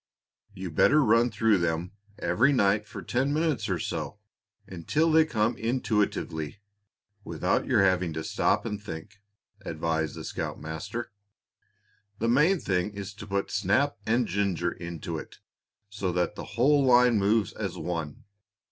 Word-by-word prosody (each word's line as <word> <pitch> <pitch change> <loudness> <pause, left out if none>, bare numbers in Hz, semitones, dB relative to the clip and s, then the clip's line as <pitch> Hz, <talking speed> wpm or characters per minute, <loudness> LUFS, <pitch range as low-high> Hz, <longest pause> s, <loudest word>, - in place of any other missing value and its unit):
"You'd 95 -3 -6
better 150 - +5
run 115 +1 +4
through 110 -2 +2
them 85 +1 -1 0.3
every 110 +11 +2
night 105 -4 +2
for - - -8
ten 130 +3 0
minutes 150 -8 0
or 95 - +1
so 85 - -4 0.5
until 125 - 0
they 160 0 +6
come 115 -4 0
intuitively, 105 - -1 0.7
without - - -1
your - - +4
having 90 -3 +2
to 80 0 -4
stop - - +1
and 105 -2 -4
think," 100 +1 -9 0.4
advised 80 -2 -2
the - - -7
scoutmaster. 80 +10 -5 1.1
"The 115 +2 0
main 155 +10 +4
thing 95 -2 -1
is 100 0 -6
to 105 0 -10
put 100 0 -2
snap 105 +9 +1
and 120 +2 +2
ginger 90 -3 0
into 85 -1 -6
it, - - -11 0.5
so 100 -2 -3
that 90 +3 0
the - - -7
whole 140 +4 +4
line 125 -3 +5
moves 105 +1 +2
as - - -4
one. 80 -4 -4
105 Hz, 145 wpm, -27 LUFS, 90-120 Hz, 1.1 s, they